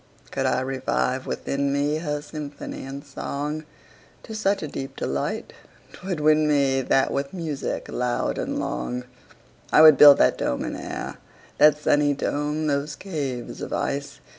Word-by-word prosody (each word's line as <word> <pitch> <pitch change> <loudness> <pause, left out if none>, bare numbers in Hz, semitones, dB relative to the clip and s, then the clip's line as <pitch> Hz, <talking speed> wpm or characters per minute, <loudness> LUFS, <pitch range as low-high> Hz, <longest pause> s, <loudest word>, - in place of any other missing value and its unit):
Could - - 0
I 130 - +1
revive 130 0 -1
within 140 0 -1
me, 145 +2 +1
Her 150 -2 -3
symphony 145 -2 -7
and 140 +1 -7
song, 145 +2 -4 0.6
To 220 - -8
such 205 -3 0
a - - -3
deep 135 -1 -6
delight 70 +1 -3 0.4
'twould 185 -3 -4
win 155 0 +4
me, 140 -3 +2
That 135 +1 +2
with 140 +5 -3
music 160 -5 -3
loud 125 -1 -1
and - - -2
long, 60 - -3 0.7
45 - - -16
I - - +8
would 155 -3 +9
build 145 -1 +10
that 65 - +3
dome 65 - -1
in - - -4
air, - - -6 0.4
That 150 -1 +7
sunny 145 -1 +2
dome! 150 +2 -1
those 145 0 -1
caves 140 -10 -5
of - - -5
ice! 140 0 -3
145 Hz, 160 wpm, -24 LUFS, 135-150 Hz, 0.7 s, build